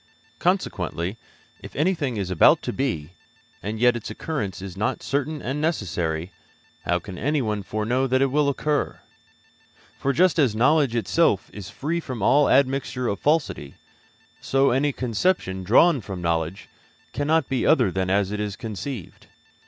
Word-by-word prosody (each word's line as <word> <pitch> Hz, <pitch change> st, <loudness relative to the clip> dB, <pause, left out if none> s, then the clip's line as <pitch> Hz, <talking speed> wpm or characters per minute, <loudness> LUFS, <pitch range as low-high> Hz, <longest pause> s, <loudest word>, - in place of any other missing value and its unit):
Consequently, 95 Hz, -, -1 dB, 0.4 s
if -, -, -11 dB
anything 150 Hz, -, 0 dB
is 95 Hz, -2 st, -3 dB
about 90 Hz, -, +5 dB
to -, -, -3 dB
be, 90 Hz, -, -2 dB, 0.5 s
and 110 Hz, +2 st, -4 dB
yet 125 Hz, 0 st, +4 dB
its 120 Hz, -, -5 dB
occurrence 110 Hz, -, -4 dB
is 95 Hz, -2 st, -7 dB
not 105 Hz, +3 st, -2 dB
certain 145 Hz, +2 st, -2 dB
and 135 Hz, +4 st, -2 dB
necessary, 90 Hz, -, -2 dB, 0.5 s
how 85 Hz, -, +2 dB
can 90 Hz, 0 st, -8 dB
anyone 125 Hz, -8 st, 0 dB
foreknow 110 Hz, +6 st, -1 dB
that 130 Hz, +1 st, +2 dB
it 135 Hz, -1 st, +2 dB
will 145 Hz, 0 st, +2 dB
occur? 145 Hz, +1 st, -1 dB, 1.0 s
For 140 Hz, -, +1 dB
just 175 Hz, +3 st, +3 dB
as 130 Hz, -8 st, +3 dB
knowledge 135 Hz, +1 st, +3 dB
itself 115 Hz, -, +1 dB
is 100 Hz, -2 st, -8 dB
free 165 Hz, +5 st, -2 dB
from 130 Hz, -, -5 dB
all 145 Hz, +6 st, +4 dB
admixture 135 Hz, -2 st, +1 dB
of 100 Hz, -3 st, -2 dB
falsity, 145 Hz, -, 0 dB, 0.6 s
so 135 Hz, 0 st, +2 dB
any 140 Hz, +4 st, +2 dB
conception 115 Hz, -, -1 dB
drawn 130 Hz, -, +5 dB
from 95 Hz, -2 st, -6 dB
knowledge 85 Hz, +1 st, -2 dB, 0.5 s
cannot 145 Hz, +3 st, +1 dB
be 130 Hz, -2 st, -1 dB
other 125 Hz, -, +4 dB
than 95 Hz, 0 st, -1 dB
as 100 Hz, 0 st, +1 dB
it 105 Hz, -, -3 dB
is 105 Hz, -1 st, -3 dB
conceived. 115 Hz, -1 st, -7 dB
120 Hz, 155 wpm, -24 LUFS, 100-145 Hz, 1.0 s, about